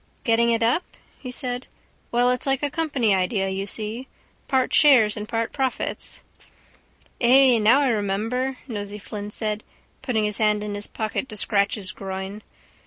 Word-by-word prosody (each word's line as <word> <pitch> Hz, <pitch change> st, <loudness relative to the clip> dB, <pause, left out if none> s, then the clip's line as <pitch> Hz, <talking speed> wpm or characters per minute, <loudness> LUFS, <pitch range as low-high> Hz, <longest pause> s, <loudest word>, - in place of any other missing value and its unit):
—Getting 235 Hz, 0 st, +3 dB
it 230 Hz, -1 st, +1 dB
up? 240 Hz, +9 st, +3 dB, 0.4 s
he 255 Hz, -, -7 dB
said. 250 Hz, -1 st, -4 dB, 0.4 s
Well, 245 Hz, +1 st, +3 dB
it's 250 Hz, +2 st, -2 dB
like 270 Hz, +1 st, 0 dB
a 290 Hz, -, 0 dB
company 285 Hz, -9 st, +1 dB
idea, 190 Hz, +1 st, 0 dB
you 195 Hz, +1 st, -3 dB
see. 220 Hz, +5 st, -2 dB, 0.4 s
Part 260 Hz, -1 st, +1 dB
shares 245 Hz, -8 st, +6 dB
and 210 Hz, -1 st, -6 dB
part 230 Hz, 0 st, -2 dB
profits. 265 Hz, -2 st, -3 dB, 1.0 s
—Ay, 255 Hz, 0 st, +6 dB
now 230 Hz, +7 st, +5 dB
I 275 Hz, -, +2 dB
remember, 225 Hz, +5 st, -1 dB
Nosey 205 Hz, -3 st, -5 dB
Flynn 205 Hz, 0 st, -7 dB
said, 210 Hz, 0 st, -3 dB, 0.4 s
putting 245 Hz, -5 st, 0 dB
his 210 Hz, -1 st, -1 dB
hand 210 Hz, -1 st, +2 dB
in 210 Hz, -1 st, -4 dB
his 205 Hz, 0 st, -2 dB
pocket 220 Hz, +4 st, -3 dB
to 215 Hz, -, -6 dB
scratch 200 Hz, -1 st, +1 dB
his 195 Hz, -4 st, -3 dB
groin. 195 Hz, +1 st, -6 dB
225 Hz, 165 wpm, -23 LUFS, 210-250 Hz, 1.0 s, shares